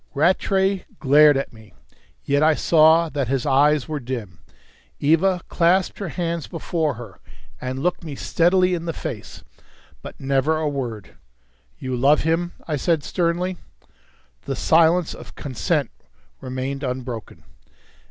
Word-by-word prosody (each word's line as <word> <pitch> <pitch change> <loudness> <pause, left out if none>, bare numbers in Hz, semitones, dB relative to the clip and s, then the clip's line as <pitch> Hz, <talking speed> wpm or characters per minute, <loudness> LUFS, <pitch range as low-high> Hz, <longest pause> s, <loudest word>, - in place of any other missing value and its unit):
Rattray 190 +4 +1
glared 145 +1 +5
at 135 - -4
me, 110 -5 -17 0.5
yet 140 +1 +1
I 155 0 +4
saw 160 +1 +5
that 140 -4 -2
his 130 0 -1
eyes 145 +1 +3
were 155 -2 -3
dim. 115 - -6 0.6
Eva 170 +5 +2
clasped 180 +2 +1
her 195 -4 -4
hands 170 0 -3
before 160 -4 -2
her, 110 -6 -11 0.4
and 130 +2 -4
looked 180 0 -1
me 155 -4 -6
steadily 180 +5 +2
in 170 -1 -3
the 165 - -2
face. - - -7 0.6
But - - -10
never 140 +3 +1
a 155 -1 -1
word. 120 -9 -5 0.6
"You 130 -1 -4
love 140 +5 +4
him?" 165 +2 0
I 155 -3 -1
said 160 +1 0
sternly. 175 +2 -1 0.9
The - - -3
silence 165 +1 +3
of - - -12
consent 130 -4 -2 0.5
remained 130 +2 -4
unbroken. 125 -5 -5
150 Hz, 135 wpm, -22 LUFS, 130-170 Hz, 0.9 s, glared